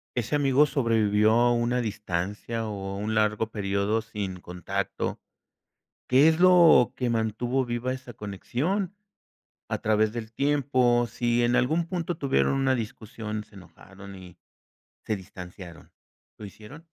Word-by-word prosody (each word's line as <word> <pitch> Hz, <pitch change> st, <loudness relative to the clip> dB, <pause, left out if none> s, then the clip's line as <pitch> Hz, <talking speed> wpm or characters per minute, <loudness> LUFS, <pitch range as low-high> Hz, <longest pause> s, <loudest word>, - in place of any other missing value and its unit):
¿Ese 120 Hz, +4 st, -1 dB
amigo 140 Hz, 0 st, +4 dB
sobrevivió 110 Hz, -6 st, +2 dB
a 120 Hz, +1 st, +4 dB
una 120 Hz, +1 st, 0 dB
distancia 105 Hz, +1 st, -3 dB
o 100 Hz, -1 st, -5 dB
un 110 Hz, +2 st, -2 dB
largo 110 Hz, +1 st, +1 dB
período 100 Hz, +1 st, -1 dB
sin 100 Hz, -5 st, -6 dB
contacto? 95 Hz, +3 st, -4 dB, 0.8 s
¿Qué 135 Hz, +4 st, +5 dB
es 160 Hz, +2 st, +2 dB
lo 175 Hz, -8 st, +6 dB
que 125 Hz, -2 st, -1 dB
mantuvo 115 Hz, +3 st, 0 dB
viva 120 Hz, +1 st, -2 dB
esa 130 Hz, -2 st, -9 dB
conexión 130 Hz, -, -3 dB, 0.8 s
a -, -, -2 dB
través 110 Hz, 0 st, +1 dB
del 115 Hz, -1 st, -7 dB
tiempo 130 Hz, -4 st, +2 dB
si 120 Hz, +1 st, 0 dB
en 120 Hz, +1 st, +2 dB
algún 155 Hz, +7 st, +1 dB
punto 175 Hz, -2 st, -3 dB
tuvieron 70 Hz, -, +1 dB
una 135 Hz, -1 st, +1 dB
discusión, 110 Hz, -1 st, -5 dB
se 105 Hz, -, -24 dB
enojaron 95 Hz, +2 st, -13 dB
y 90 Hz, -2 st, -13 dB, 0.7 s
se 110 Hz, -, -1 dB
distanciaron? 90 Hz, -2 st, -11 dB, 0.5 s
¿Lo 105 Hz, -, -8 dB
hicieron? 120 Hz, -, -13 dB
115 Hz, 135 wpm, -26 LUFS, 105-130 Hz, 0.8 s, lo